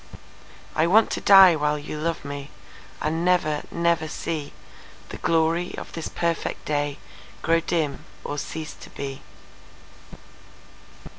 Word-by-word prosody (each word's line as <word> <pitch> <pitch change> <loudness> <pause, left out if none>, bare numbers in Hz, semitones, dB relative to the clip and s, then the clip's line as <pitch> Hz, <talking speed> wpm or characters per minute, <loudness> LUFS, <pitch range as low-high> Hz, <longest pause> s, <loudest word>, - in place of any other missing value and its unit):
I 160 - +3
want 215 +5 +5
to - - -2
die 195 -3 +8
while 150 0 +1
you 150 +1 -6
love 165 +1 -2
meAnd 140 -1 -6 0.7
never, 170 -4 +2
never 170 -1 +1
seeThe 155 -1 -8
glory 165 +2 +1
of - - -7
this 165 - -4
perfect 170 -1 -2
dayGrow 150 +3 -2
dim 155 -5 -1 0.2
or 145 - -3
cease 155 +1 -5
to - - -13
be. 135 -1 -6
160 Hz, 115 wpm, -24 LUFS, 150-170 Hz, 0.7 s, die